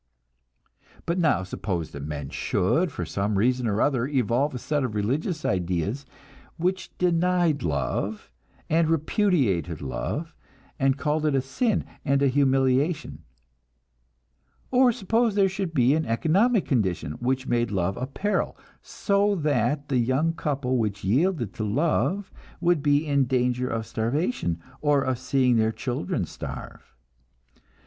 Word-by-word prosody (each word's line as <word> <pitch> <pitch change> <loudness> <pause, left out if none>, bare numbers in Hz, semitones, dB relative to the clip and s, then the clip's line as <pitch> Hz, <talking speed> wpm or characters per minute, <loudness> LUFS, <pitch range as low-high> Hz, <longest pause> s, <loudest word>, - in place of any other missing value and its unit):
But 170 +2 0
now 155 - +2
suppose 95 -3 -4
that 70 - -7
men 75 -2 -5
should, 155 - +1
for 90 - -4
some 100 +5 -1
reason 125 +3 +2
or 105 0 0
other, 130 -3 +1
evolve 135 +1 +1
a - - -2
set 145 +3 -1
of 115 -5 -3
religious 150 - -1
ideas 95 - -1 0.5
which 185 +3 -1
denied 175 -3 +2
love, 90 +6 -2 0.4
and 160 0 +2
repudiated 145 - +1
love, 140 - -4 0.5
and 135 0 +2
called 155 +1 0
it 145 - +1
a 135 - +3
sin 215 - 0 0.2
and 140 0 +2
a 140 - +4
humiliation; 135 +3 +1 1.5
or 255 -1 +5
suppose 225 +1 +1
there 200 -1 +4
should 190 -2 -3
be 130 -3 +3
an 160 +1 0
economic 190 - +2
condition 95 - 0
which 130 +2 -1
made 120 -1 +1
love 95 -1 -1
a 130 - -4
peril, 200 +9 -1 0.2
so 200 0 +1
that 145 - 0
the 130 -3 +2
young 130 +7 +1
couple 140 -6 -1
which 105 -2 -2
yielded 125 - +1
to 110 - -4
love 165 - 0 0.3
would 175 -3 +2
be 145 +1 +2
in 140 -3 +2
danger 125 0 0
of 115 -2 -3
starvation, 115 - -1 0.2
or 145 -2 +3
of 130 -2 -1
seeing 130 -1 +2
their 110 0 +2
children 120 -5 -2
starve. - - -9
135 Hz, 140 wpm, -25 LUFS, 115-165 Hz, 1.5 s, or